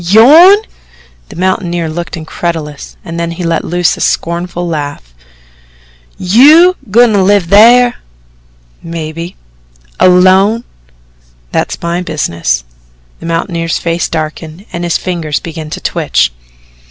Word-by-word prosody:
"YOURN!" 285 - +7 0.7
The - - -12
mountaineer 175 -2 -1
looked 170 +2 -5
incredulous 160 -2 -6
and 165 0 -6
then 170 0 -2
he 170 +2 -6
let 165 -1 -1
loose 175 -1 0
a - - -9
scornful 175 +1 -2
laugh. 145 - -5 1.0
"YOU 295 - +5
goin' 235 +2 +4
to 200 - +2
live 200 0 +3
thar?" 235 +7 +5 0.8
"Maybe." 165 +1 -7 0.6
"Alone?" 190 +5 +4 0.9
"That's - - -2
my 170 +1 -2
business." 85 - -2 0.6
The - - -8
mountaineer's 165 0 -2
face 170 0 -2
darkened 160 +3 -6
and 170 - -4
his 170 -1 0
fingers 165 -5 -3
began 160 -2 -8
to - - -6
twitch. - - -1
170 Hz, 115 wpm, -11 LUFS, 165-195 Hz, 1.0 s, YOURN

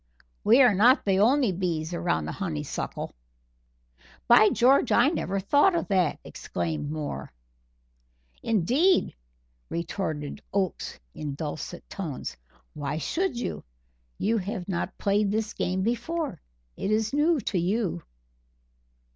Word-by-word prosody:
We 240 +6 +6
are 245 -4 +6
not 240 +8 +5
the 195 -1 +2
only 245 +1 +4
bees 170 -3 -2
around 170 0 0
the - - -4
honeysuckle." 155 -7 -4 1.1
"By 215 - +7
George! 255 +1 +4
I 245 +4 +5
never 195 - -2
thought 290 - +4
of 335 - -2
that," 185 -6 +2
exclaimed 85 - -4
Moore. 155 -1 -5 1.1
"Indeed!" 255 - +2 0.6
retorted 165 -2 -4
Oakes 195 -3 -2
in 145 -2 -5
dulcet 150 0 -6
tones. 165 -10 -5 0.4
"Why 145 0 -3
should 345 - -1
you? - - -4 0.5
You 225 +2 +1
have 195 -1 -5
not 180 -3 -3
played 200 0 +1
this 220 +1 -1
game 185 +1 -1
before 245 - -2 0.3
it - - -3
is 215 +2 +1
new 305 +2 +3
to 190 - -1
you." 185 - -1
200 Hz, 120 wpm, -27 LUFS, 170-240 Hz, 1.1 s, By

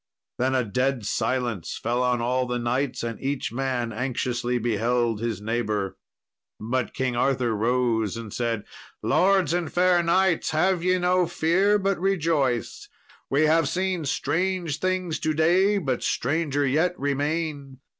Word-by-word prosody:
Then 130 +1 +1
a 130 - +2
dead 125 +1 -1
silence 120 -8 -2
fell 120 +2 -1
on 125 -1 +1
all 125 +2 0
the 125 0 -1
knights, 125 +3 -1
and 115 -1 -4
each 135 -2 -2
man 120 -2 -2
anxiously 125 0 -1
beheld 115 0 0
his 115 -4 -2
neighbour. 105 -3 -2 0.6
But 120 +3 -2
King 130 -1 -1
Arthur 125 -2 +1
rose 115 -1 0
and 115 -3 -7
said, 115 -3 -2 0.4
"Lords 190 -4 +3
and 175 -2 -1
fair 180 0 +3
knights, 175 +1 +2
have 175 +3 +1
ye 185 0 +3
no 180 0 +2
fear, 190 +7 +2
but 195 -2 0
rejoice; 160 -10 0 0.4
we 140 +3 +2
have 155 -1 +3
seen 185 -2 -1
strange 165 +3 -1
things 185 -3 -1
to 155 -1 -1
day, 185 +6 +3
but 135 -10 -1
stranger 145 +1 0
yet 160 +7 +1
remain. 145 0 -2
135 Hz, 145 wpm, -25 LUFS, 120-170 Hz, 0.6 s, Lords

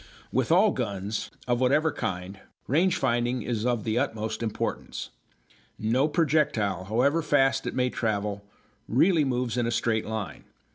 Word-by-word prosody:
With 130 +4 0
all 195 +5 +5
guns, 105 - -3 0.2
of 120 0 +1
whatever 150 +5 +3
kind, 95 +1 -4 0.3
range 175 +7 +2
finding 120 -1 0
is 115 -1 -1
of 120 -3 0
the 110 -1 0
utmost 110 0 -2
importance. 110 -2 -3 0.7
No 120 +7 +2
projectile, 145 - +1
however 125 - +2
fast 135 -3 +2
it - - -3
may 125 -1 +1
travel, 105 -2 -2 0.4
really 160 +6 +4
moves 125 -3 -1
in 120 -1 +1
a - - -1
straight 110 -2 0
line. 110 -2 -5
120 Hz, 145 wpm, -27 LUFS, 110-140 Hz, 0.7 s, all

